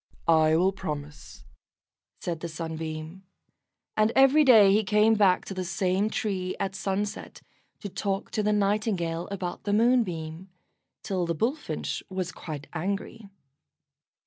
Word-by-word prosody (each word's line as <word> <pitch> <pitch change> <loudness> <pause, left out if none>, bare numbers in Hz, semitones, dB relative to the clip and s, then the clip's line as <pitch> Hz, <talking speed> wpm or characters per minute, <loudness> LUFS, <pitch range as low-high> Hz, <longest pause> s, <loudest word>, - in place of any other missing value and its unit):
"I 160 -1 +5
will 185 +3 +3
promise," 150 -6 -7 0.8
said 170 -2 -3
the 170 - -5
Sunbeam, 160 +2 -6 0.7
and 215 +1 +3
every 270 +3 +6
day 215 -8 +7
he 215 +2 +3
came 210 +2 +4
back 200 -4 +3
to - - -6
the 185 -1 -3
same 190 +3 0
tree 185 -4 -2
at 195 -1 -2
sunset, 200 +2 -4 0.4
to 205 - -5
talk 195 0 -3
to 215 - 0
the 210 0 +1
Nightingale 195 -5 0
about 185 -3 -5
the 205 - 0
Moonbeam, 190 -7 +1 0.5
till 185 -3 -1
the 170 - -1
Bullfinch 250 - -2
was 185 -1 -3
quite 150 -3 -7
angry. 200 +4 -4
190 Hz, 135 wpm, -27 LUFS, 170-210 Hz, 0.8 s, day